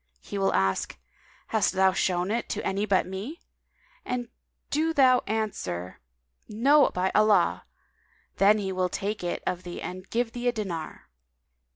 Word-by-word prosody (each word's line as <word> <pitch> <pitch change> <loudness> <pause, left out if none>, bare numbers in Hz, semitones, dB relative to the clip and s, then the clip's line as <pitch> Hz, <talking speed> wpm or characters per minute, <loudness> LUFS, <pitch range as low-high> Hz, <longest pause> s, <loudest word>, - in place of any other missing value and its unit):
He 200 - -6
will 195 - +2
ask, 95 -7 0 0.5
'Hast 220 -2 +2
thou 190 0 +4
shown 180 0 0
it 235 +1 -2
to - - -3
any 200 +2 -1
but 190 -2 +3
me?;' 200 - -6 0.6
and 245 -1 -3 0.4
do 320 +2 +1
thou 255 -2 +6
answer, 200 - -3 0.5
"No, 275 +8 +4
by 185 +1 -1
Allah!' 215 0 +3 0.7
then 205 +2 +5 0.2
will 185 0 +1
he - - -12
take 205 +2 -3
it 175 - -3
of 180 -1 -2
thee 175 -1 -7
and 185 +1 -7
give 235 0 0
thee 245 +1 -3
a - - +4
dinar. 175 - -5
200 Hz, 155 wpm, -27 LUFS, 185-235 Hz, 0.7 s, thou